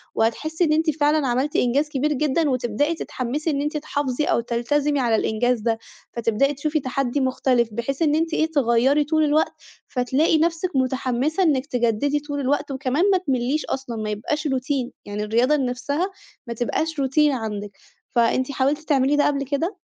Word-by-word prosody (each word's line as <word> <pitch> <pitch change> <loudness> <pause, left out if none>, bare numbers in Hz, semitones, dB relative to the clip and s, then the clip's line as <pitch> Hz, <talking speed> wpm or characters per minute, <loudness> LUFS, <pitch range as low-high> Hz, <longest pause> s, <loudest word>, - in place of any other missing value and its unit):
وهتحسّي 310 +10 0
إن 310 -2 +3
أنتِ 320 +1 +2
فعلًا 295 -1 +3
عملتِ 260 +4 0
إنجاز 280 +5 +2
كبير 295 +1 0
جدًا 300 +2 +1
وتبدئي 255 +5 0
تتحمّسي 290 +2 -3
إن 280 -1 -1
أنتِ 300 +1 -2
تحافظي 290 -2 -2
أو - - +2
تلتزمي 275 +5 0
على 235 -3 +2
الإنجاز 240 +3 +1
ده، 225 0 0 0.4
فتبدئي 235 +4 +1
تشوفي 305 +2 -1
تحدّي 260 0 -1
مختلِف، 255 -2 +1
بحيث 235 +6 -3
إن 300 -2 +3
أنتِ 325 +1 0
إيه، 320 0 +1
تغيّري 270 +1 +3
طُول 315 +1 +1
الوقت، 305 +1 +2 0.3
فتلاقي 260 +6 +1
نفسِك 335 +1 0
متحمِّسة 260 +5 0
إنِّك 285 -6 +2
تجدّدي 245 +2 0
طول 290 0 -5
الوقت 285 +2 0
وكمان 270 +4 0
ما 380 - +4
تملّيش 275 -3 -1
أصلًا 265 -3 -4
ما 215 -1 -3
يبقاش 295 +9 -2
روتين 260 -1 -1
يعني 205 +1 -4
الرياضة 235 +7 +2
ان 275 -3 0
نَفسها 285 +9 -2 0.4
ما 235 - -3
تبقاش 305 +7 -2
روتين 285 +2 +3
عندِك، 210 -5 -4 0.3
فأنتِ 240 +3 +1
حاولتِ 275 +2 +1
تعملي 290 -2 +2
ده 290 - +3
قبل 280 -1 0
كده؟ 305 +8 -2
275 Hz, 170 wpm, -23 LUFS, 245-300 Hz, 0.4 s, ما